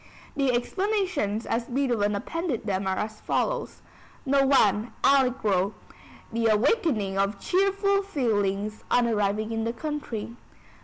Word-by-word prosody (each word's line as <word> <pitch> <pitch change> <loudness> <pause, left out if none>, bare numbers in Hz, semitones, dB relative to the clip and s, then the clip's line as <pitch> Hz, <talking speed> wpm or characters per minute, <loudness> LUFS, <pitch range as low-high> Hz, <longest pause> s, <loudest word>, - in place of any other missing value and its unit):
The 275 -2 +2
explanations 350 - -1
as 230 +1 -1
Beethoven 240 -5 0
appended 295 - -3
them 195 -2 -1
are 190 0 0
as 215 0 -4
follows: - - -2 0.4
No. 275 0 +3
I. 215 -3 +3
Allegro: 230 -8 +2 0.6
The 230 0 +1
awakening 215 - +1
of 200 0 0
cheerful 395 - +2
feelings 215 - -1
on 245 - +3
arriving 215 0 0
in 225 0 -1
the 230 +1 -1
country. 240 -5 -5
230 Hz, 120 wpm, -26 LUFS, 210-285 Hz, 0.6 s, No